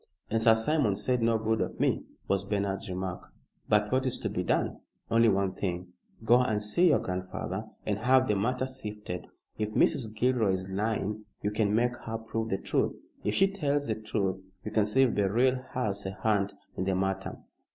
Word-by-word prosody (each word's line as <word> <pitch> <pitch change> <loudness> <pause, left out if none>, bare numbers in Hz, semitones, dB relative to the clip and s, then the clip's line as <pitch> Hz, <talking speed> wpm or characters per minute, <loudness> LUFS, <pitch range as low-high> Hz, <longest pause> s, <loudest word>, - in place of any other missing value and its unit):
"And 115 0 +2
Sir 115 0 +6
Simon 110 -2 +2
said 120 +5 0
no 115 0 +3
good 110 0 0
of - - -3
me," - - +2 0.3
was 100 -1 +1
Bernard's 100 0 -2
remark. 90 0 -5 0.4
"But 105 0 +3
what 130 +1 +2
is 130 - -1
to - - -1
be - - -1
done?" - - 0 0.3
"Only 115 0 +5
one 95 -2 +1
thing. 90 -2 -4 0.3
Go 120 +3 +6
and 110 -4 +1
see 105 +13 +3
your 150 - +5
grandfather 95 +2 -4 0.2
and 105 -1 -1
have 130 +3 +4
the 105 - +2
matter 125 +6 0
sifted. 105 -8 -6 0.3
If 105 0 -1
Mrs. 110 -4 +2
Gilroy 115 -4 +2
is 95 0 -3
lying 105 +1 -1 0.2
you 105 - +1
can 105 -1 +1
make 120 +2 +2
her 115 0 -2
prove 115 0 -3
the 95 - +1
truth. - - 0 0.3
If - - 0
she 195 - +5
tells 145 -7 0
the 110 - 0
truth, 100 -3 -2 0.2
you 105 - -4
can 110 -1 +2
see 130 +6 +4
if 125 - +2
Beryl 120 +6 +2
has 105 -5 -1
a 95 - -4
hand 105 -2 +1 0.2
in 95 - -2
the 95 -1 +1
matter." 95 0 -2
110 Hz, 195 wpm, -29 LUFS, 100-120 Hz, 0.4 s, Sir